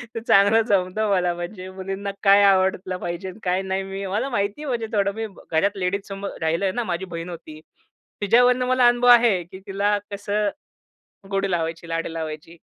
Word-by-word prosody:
ते - - -1
चांगलं 205 +3 +5
जमत 185 +1 +1
मला. 185 -5 +1
म्हणजे 185 +2 -7
मुलींना 195 +1 -5
काय 200 0 +6
आवडलं 190 -1 +2
पाहिजे 175 +2 -5
अन 185 - -11
काय 185 +1 +1
नाही. 190 0 -2
मी 195 +1 -6
मला 220 +8 -1
माहिती 205 +3 -2
आहे 300 - -6
म्हणजे 235 -3 -2
थोडं. 200 -1 +2
मी 225 0 -3 0.2
घरात 195 +6 +1
लेडीजसमोर 195 +1 -3
राहिलोय 170 +4 0
ना. 240 +2 -2
माझी 180 -2 -3
बहीण 170 0 -6
होती. 155 -2 -9 0.6
तिच्यावरनं 245 +4 +4
मला 255 -1 +4
अनुभव 245 0 +3
आहे, 230 -7 +6
की 185 +3 -12
तिला 200 +1 +1
कसं, 205 +1 -1 0.8
गोडी 195 0 0
लावायची, 165 0 -2
लाडी 165 0 -3
लावायची. 160 +1 -6
195 Hz, 175 wpm, -23 LUFS, 180-205 Hz, 0.8 s, काय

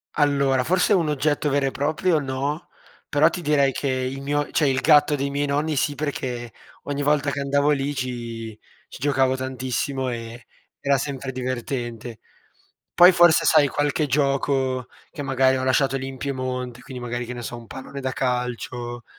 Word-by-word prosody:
Allora 140 -3 +2
forse 180 +7 +2
un 170 -6 +2
oggetto 150 0 0
vero 140 -1 +1
e - - -1
proprio 155 +5 +1
no, 140 +3 -3 0.4
però 150 +3 +4
ti 175 - -5
direi 145 -4 +3
che 140 - -3
il 130 +1 -2
mio 145 +1 -1
cioè 150 - +2
il 135 0 +2
gatto 150 0 +5
dei 140 0 -2
miei 145 +1 -1
nonni 150 +2 0
sì, 145 +1 +1
perché 130 -5 -4 0.3
ogni 145 0 -3
volta 145 0 +2
che 140 - -3
andavo 140 +1 +1
lì 140 0 0
ci 115 -4 -5 0.3
ci - - -11
giocavo 135 -2 +2
tantissimo 130 +1 -2
e 115 0 -7 0.3
era 140 0 +2
sempre 135 -1 -4
divertente. 120 -2 -4 0.8
Poi 180 +1 +8
forse 175 -2 +5
sai, 155 -3 +5
qualche 145 +2 0
gioco 135 -2 0 0.2
che 155 - -6
magari 135 -1 +2
ho 130 - -2
lasciato 135 +1 +2
lì 130 0 -4
in 135 - -7
Piemonte, 130 -2 -4
quindi 130 -4 -8
magari, 120 0 -3
che 125 - -5
ne 120 - -7
so, 120 +1 -5
un 115 - -11
pallone 135 +3 -8
da 130 -1 -2
calcio, 125 -1 -3
135 Hz, 175 wpm, -23 LUFS, 125-145 Hz, 0.8 s, Poi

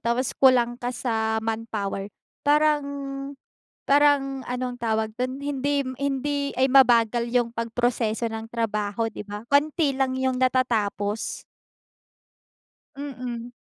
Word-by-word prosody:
tapos 235 +2 0
kulang 245 -3 +4
ka 245 - -2
sa 220 -3 -1
manpower, 215 -3 -3 0.3
parang, 300 0 +3 1.1
parang 275 -2 +3
anong 250 0 -3
tawag 220 -1 0
do'n, 255 +2 -3
hindi 285 0 0
m 260 0 -6
hindi 280 +1 -1
ay, 260 +1 +3
mabagal 240 -3 +5
yung 240 -2 +2
pagproseso 230 -1 -1
ng 225 0 -6
trabaho 225 -1 -1
'di 210 - -8
ba? 205 +1 -7
Konti 290 0 +2
lang 265 -1 +1
yung 260 -1 +1
natatapos. 225 -5 0 1.5
Mm. 250 -4 -6
245 Hz, 115 wpm, -25 LUFS, 225-270 Hz, 1.5 s, mabagal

